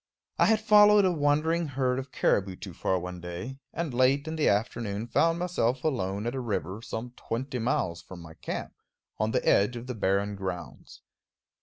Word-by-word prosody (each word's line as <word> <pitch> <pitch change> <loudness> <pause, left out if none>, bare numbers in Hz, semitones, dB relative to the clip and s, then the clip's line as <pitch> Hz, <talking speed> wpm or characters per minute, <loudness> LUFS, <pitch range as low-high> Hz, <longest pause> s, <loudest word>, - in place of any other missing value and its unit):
I - - +5
had 220 -1 +4
followed 210 -1 +6
a 185 - +3
wandering 160 +2 +1
herd 130 -2 0
of 130 0 -7
caribou 95 -5 +1
too 95 -1 -9
far 95 - 0
one 90 0 -6
day, 90 +10 -6
and 165 -6 -3
late 135 +4 +3
in 160 - -3
the 155 - +2
afternoon 105 0 -1
found 165 +7 +2
myself 135 -9 0
alone 100 -8 -1
at 120 - -1
a 135 - -3
river, 105 -4 -3
some 120 +1 -5
twenty 125 +2 -4
miles 115 - -1
from 95 - -11
my 85 -1 -11
camp, - - -5 0.5
on 110 - +1
the - - -1
edge 105 +5 +4
of 120 0 -6
the 125 - -4
barren 100 -1 0
grounds. 95 -3 -7
120 Hz, 185 wpm, -28 LUFS, 100-145 Hz, 0.5 s, followed